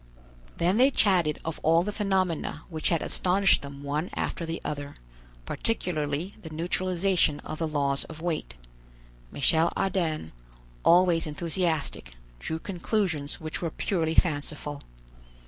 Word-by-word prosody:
Then 180 +4 +2
they 260 +3 +6
chatted 180 - +3
of 160 0 -3
all 165 +2 +4
the 210 - -2
phenomena 190 -6 0
which 160 -2 -1
had 170 - +1
astonished 190 +1 +3
them 140 0 -9
one 150 +5 -2
after 165 - -2
the 165 +1 -3
other, 145 -1 -4 0.5
particularly 170 - -1
the 160 - -8
neutralization 180 0 +1
of 155 - -6
the 165 - 0
laws 140 -2 0
of 160 -1 -10
weight. 160 - -3 0.8
Michel 160 +5 +3
Ardan, 165 - -1 0.5
always 175 -2 +5
enthusiastic, 160 - -2 0.2
drew 160 - -3
conclusions 175 -4 -2
which 155 -1 -4
were 170 - -1
purely 165 -1 -1
fanciful. 145 -2 0
165 Hz, 130 wpm, -27 LUFS, 150-180 Hz, 0.8 s, they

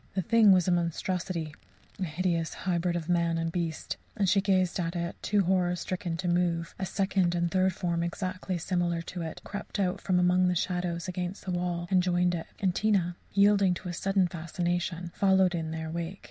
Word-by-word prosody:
The 190 - 0
thing 220 +1 +6
was 185 -2 +4
a - - +3
monstrosity, 170 -1 -1 0.5
a - - -1
hideous 170 0 -1
hybrid 175 -1 -1
of 165 -2 -3
man 170 -1 +2
and 165 0 -1
beast, 165 -2 -3 0.2
and 205 - -1
as 190 - +3
she 195 0 +4
gazed 185 -2 +1
at 170 0 -2
it, 170 0 -2
too 205 -1 +2
horror 180 -1 +2
stricken 175 -1 -3
to 180 +1 -3
move, 175 -1 0
a 190 - -2
second 190 -3 +1
and 170 -1 0
third 190 0 +3
form 170 -1 -1
exactly 185 +1 -3
similar 175 -1 -1
to 175 +1 -6
it 160 -1 -6
crept 205 +1 -6
out 185 -2 0
from 185 -2 +1
among 180 +1 +4
the 180 - +1
shadows 175 -1 -1
against 180 +1 -4
the 185 - -2
wall 175 -1 -2
and 185 -1 +5
joined 180 0 +2
it. 165 -2 -4
And 190 -4 +1
Tina, 190 -4 +1 0.2
yielding 200 -2 +4
to 180 +1 -6
a - - -4
sudden 195 +1 +1
fascination, 175 +1 -3
followed 190 -2 +3
in 165 -2 -2
their 160 0 -4
wake. 170 +3 -4
180 Hz, 200 wpm, -29 LUFS, 170-185 Hz, 0.5 s, thing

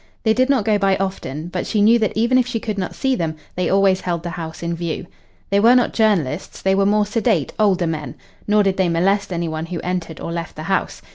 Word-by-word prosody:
They 220 - +3
did 255 +3 +2
not 260 -7 +2
go 210 -2 +2
by 195 -1 +2
often, 175 -5 -4
but 180 0 -3
she 215 - 0
knew 225 +3 +5
that 215 -3 0
even 235 +3 +3
if 250 - +1
she 235 -2 -2
could 215 -2 -4
not 185 - -4
see 265 -1 0
them 165 -7 -2 0.2
they 180 0 -1
always 195 -1 +3
held 170 -2 -2
the 175 - -4
house 165 -1 -7
in 170 0 -1
view. 170 +1 -4 0.5
They 200 - +4
were 235 +4 +6
not 245 - +2
journalists 190 - 0
they 190 - +1
were 195 0 +2
more 210 0 +3
sedate, 210 - 0
older 195 -4 +3
men. 155 -3 -4 0.3
Nor 210 0 +4
did 195 -1 0
they 190 -2 +2
molest 195 +4 +1
any 170 -1 -2
one 160 +1 -4
who 175 -1 -4
entered 180 -3 -4
or - - -5
left 170 -2 -5
the 155 - -7
house. 190 +4 -2
190 Hz, 250 wpm, -20 LUFS, 170-215 Hz, 0.5 s, were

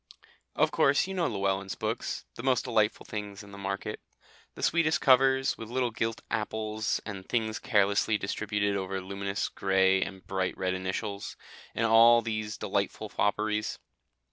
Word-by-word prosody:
Of - - +3
course 140 +1 +3
you 190 - -5
know 180 -3 +1
Llewellyn's 95 -1 -1
books - - -3
the - - -8
most 130 -1 +2
delightful 110 -1 +1
things 105 -1 -6
in 100 - -13
the 100 - -10
market: 100 0 -4 0.6
the - - -7
sweetest 160 -1 +3
covers, 135 0 +4
with 115 -1 -7
little 125 -1 0
gilt 115 +1 -2
apples 110 0 -1
and 100 -3 -7
things 110 -1 0
carelessly 105 -2 +2
distributed 100 0 -1
over 95 0 -2
luminous 100 +1 -3
grey, 95 0 +2
and 95 -1 -5
bright 95 -1 -2
red 95 0 0
initials, 95 +2 -4 0.4
and 115 - +1
all 115 +1 +7
these 110 -1 -3
delightful 105 +1 -2
fopperies. 105 +1 0
105 Hz, 150 wpm, -29 LUFS, 100-115 Hz, 0.6 s, all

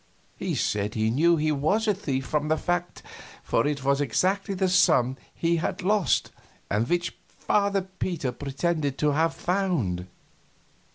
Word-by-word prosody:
He - - -3
said 105 0 -1
he 110 0 +1
knew 165 +7 +4
he 155 0 +1
was 175 +10 +1
a 210 - +4
thief 140 -9 -3
from 150 0 -1
that 155 +1 0
fact, 175 0 -2 0.4
for 115 - +1
it 145 -2 -2
was 140 +1 +2
exactly 190 - 0
the 190 0 +1
sum 155 -8 +4 0.2
he 170 0 0
had 165 - -3
lost 195 - +2 0.4
and 105 +4 +1
which 175 0 0
Father 200 -2 0 0.2
Peter 160 -8 -1
pretended 140 +2 -2
he - - +1
had 160 +3 +3
"found." 160 - -1
155 Hz, 155 wpm, -26 LUFS, 135-180 Hz, 0.4 s, knew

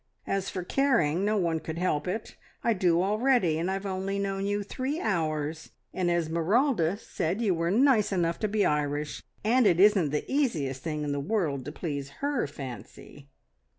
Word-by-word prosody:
As 195 -1 -1
for 185 - -4
caring 190 - +2
no 210 +1 +1
one 170 -4 +1
could 160 +1 -6
help 170 -4 0
it. 215 +5 -4 0.3
I 235 - +3
do 180 -3 +2
already, 210 -5 +2
and 170 +3 -1
I've 195 +1 -3
only 195 +1 -2
known 195 0 -2
you 205 0 -1
three 260 +9 -3
hours, 160 - -2 0.2
and 180 -2 0
Esmeralda 175 - +1
said 185 -2 -3
you 215 -5 +2
were 165 0 0
nice 230 0 +4
enough 170 -3 0
to 215 - 0
be 210 0 +1
Irish, 150 0 -1 0.2
and 235 +2 +4
it 175 -3 +3
isn't 195 -6 +5
the 150 +1 -2
easiest 155 - 0
thing 150 -1 -3
in 145 - -2
the 145 - -1
world 145 - -1
to 145 - -5
please 145 -4 -4
her 285 - 0
fancy." 140 +1 -10
180 Hz, 180 wpm, -28 LUFS, 155-210 Hz, 0.3 s, isn't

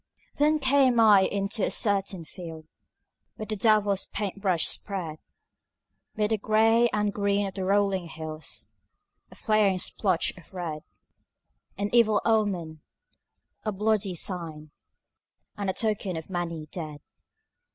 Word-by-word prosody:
Then 300 +2 +3
came 265 -3 +3
I 210 -3 +7
into 200 +2 -1
a - - +2
certain 195 -5 +1
field 160 -2 -9 0.7
Where 215 - -6
the 215 - -3
devil's 205 -2 +2
paint 200 -1 -5
brush 185 -5 +2
spread 170 -6 -2 1.0
'Mid 210 0 0
the 220 - +1
gray 225 +3 +3
and 210 -1 0
green 200 0 0
of 195 - -5
the 190 -2 -4
rolling 195 -2 +1
hills 155 -1 -6 0.6
A - - -15
flaring 215 -4 +2
splotch 185 -1 0
of 180 - -17
red, 165 -4 -4 1.0
An 205 +1 -2
evil 230 -3 +4
omen, 185 -8 0 0.8
a 215 - -1
bloody 210 -2 0
sign, 160 -4 -1 0.8
And 200 -2 -3
a - - 0
token 210 -5 -1
of 160 +3 -8
many 170 -3 -3
dead. 155 -4 -7
200 Hz, 130 wpm, -26 LUFS, 175-215 Hz, 1.0 s, I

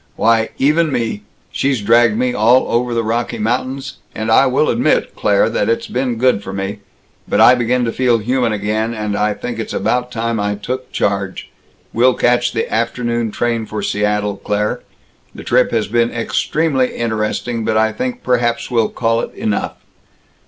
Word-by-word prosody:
Why, 115 0 +2
even 155 +3 +2
me 115 -5 -2 0.3
she's 135 -2 0
dragged 115 +1 +3
me 125 +1 0
all 120 +3 +4
over 120 +1 0
the 115 - +1
Rocky 115 +2 -2
Mountains. 130 +5 -2 0.2
And 110 0 -2
I 135 +4 +5
will 130 +4 +2
admit, - - +1
Claire, - - +2
that - - 0
it's 115 - 0
been 125 -1 -2
good 125 -3 +2
for 95 - -7
me. 95 +1 -4 0.5
But - - +1
I 125 - +8
begin 125 0 +1
to 115 - -1
feel 125 -2 +2
human 120 +2 0
again, 110 +2 -1
and 105 -1 -3
I 105 0 0
think 120 +2 -5
it's 110 - -4
about 125 +4 0
time 115 -1 -2
I 105 0 -1
took 125 +5 -5
charge. 100 -2 -2 0.4
We'll 125 +2 +3
catch 120 0 +2
the 115 - -2
afternoon 120 0 -1
train 115 0 -2
for 105 -1 -4
Seattle, 105 -1 -1
Claire. 105 +1 -2 0.5
The - - -9
trip 125 +1 +2
has 115 -2 -1
been 115 +2 +1
extremely 130 +3 0
interesting, 115 +1 -2
but 110 0 0
I 110 0 +3
think 250 -1 -4
perhaps 120 -1 0
we'll 115 -3 +2
call 115 0 0
it - - -5
enough. 105 -2 -2
115 Hz, 175 wpm, -17 LUFS, 110-125 Hz, 0.5 s, I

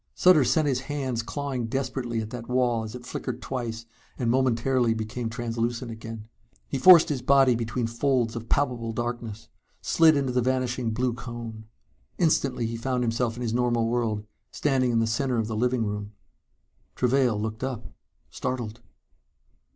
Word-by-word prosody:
Sutter 180 -6 +6
sent 140 +5 +2
his 130 -3 +1
hands 130 -5 -1
clawing 130 -1 -3
desperately 120 -2 -2
at 110 0 -7
that 120 -1 -7
wall 125 -2 +2
as 110 +1 -7
it 125 0 -9
flickered 125 -1 -4
twice 115 -3 -4 0.3
and 120 -2 0
momentarily 125 -1 +2
became 110 +2 -4
translucent 115 0 -3
again. 110 -1 -8 0.4
He 135 - -3
forced 170 +2 +8
his 140 -4 -1
body 135 0 +5
between 115 +1 -2
folds 120 0 0
of 115 0 -6
palpable 125 -5 0
darkness, 120 -2 -4 0.3
slid 160 -2 +4
into 135 -3 -1
the 125 - +2
vanishing 125 -1 0
blue 125 +2 0
cone. 115 -2 -7 0.5
Instantly 140 -8 +1
he 115 +1 -3
found 125 +1 -1
himself 115 0 0
in 125 - -5
his 115 -2 -1
normal 120 -1 +1
world, 115 -3 -1 0.2
standing 135 -3 +1
in 115 - +1
the 115 - +3
center 125 +3 0
of 110 - +1
the 110 0 -3
sitting 125 -1 +1
room. 105 0 -4 0.8
Travail 125 -3 +2
looked 110 +2 -4
up, 130 -4 -3 0.5
startled. 120 -3 -4
120 Hz, 160 wpm, -26 LUFS, 115-130 Hz, 0.8 s, forced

